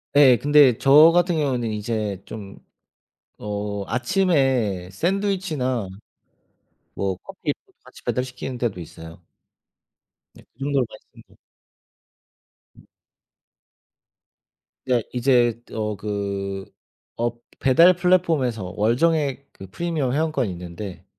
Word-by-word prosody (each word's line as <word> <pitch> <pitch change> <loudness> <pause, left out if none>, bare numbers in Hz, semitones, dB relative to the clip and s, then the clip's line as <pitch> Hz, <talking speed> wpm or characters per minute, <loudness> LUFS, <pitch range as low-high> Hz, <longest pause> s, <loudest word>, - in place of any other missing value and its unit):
예. 135 -4 +7
근데 145 -4 +5
저 150 +4 +7
같은 175 0 +2
경우는 125 -6 -1
이제 105 -2 -3
좀 100 -3 -9 0.8
어 105 -1 -4
아침에 130 - +1
샌드위치나 165 - -1 1.1
뭐 95 -1 -2
커피도 - - -4 0.3
같이 - - -16
배달시키는 125 0 -3
데도 115 -7 -2
있어요. 80 0 -11 1.1
네. - - -17
그 120 - -39
정도로 135 -2 0
많이 110 - -13
씁니다. - - -19 1.4
음. - - -18 2.0
네. 125 -3 +1
이제 120 -2 +2
어 105 -1 -3
그 100 -1 -4 0.5
엎 120 0 -3 0.2
배달 165 +7 +6
플랫폼에서 160 - +1
월 110 +3 +2
정액 145 -4 0
그 95 - -11
프리미엄 160 - -2
회원권이 155 -7 0
있는데 90 +2 -8
125 Hz, 215 characters per minute, -23 LUFS, 105-150 Hz, 2.0 s, 예